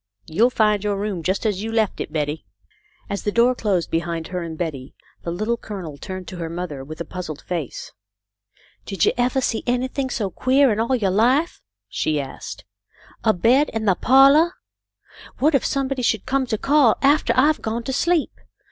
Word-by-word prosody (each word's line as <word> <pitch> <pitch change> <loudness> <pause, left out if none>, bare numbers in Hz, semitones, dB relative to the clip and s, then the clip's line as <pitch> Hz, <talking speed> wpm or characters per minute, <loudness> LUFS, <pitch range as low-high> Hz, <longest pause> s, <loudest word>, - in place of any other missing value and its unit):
You'll 220 +10 +2
find 210 -4 +2
your 205 -1 -1
room 200 -3 -3
just 190 +6 -1
as 205 -3 0
you 225 +1 -4
left 220 -3 0
it, - - -5
Betty." 150 0 -2 0.6
As 200 - -3
the 205 - -1
door 235 +3 +4
closed 200 -8 -1
behind 165 0 -2
her 180 -1 -3
and 165 -2 -6
Betty, 145 -6 -5 0.3
the - - -5
Little 215 +7 -1
Colonel 190 -10 -7
turned 185 +4 -7
to 185 - -8
her 165 -1 -4
mother 165 -5 -5
with 155 +3 -9
a - - -4
puzzled 175 -5 -7
face. 170 -7 -5 0.5
" 105 0 -34
Did 195 -5 +1
you - - +4
evah 250 +2 +1
see 225 - 0
anything 260 +2 -1
so 205 -6 -2
queah 265 +5 +3
in 210 - -1
all 235 +3 +1
yo' 200 -6 0
life 255 - +2 0.2
?" - - -65
she 155 -1 -1
asked. 135 -6 -7 0.3
" - - -25
A 220 - +4
bed 245 +10 +3
in 220 -1 -2
the 195 - +4
pahlah! 275 - +5 0.8
What 305 +4 +2
if 275 - +3
some 275 -1 0
body 265 -1 -3
should 220 -4 0
come 265 0 0
to 220 - -1
call 275 -2 +3
aftah 275 -4 +3
I've 295 +4 +3
gone 225 +2 -3
to 265 - -3
sleep. 335 +3 +1
215 Hz, 200 wpm, -22 LUFS, 175-255 Hz, 0.8 s, pahlah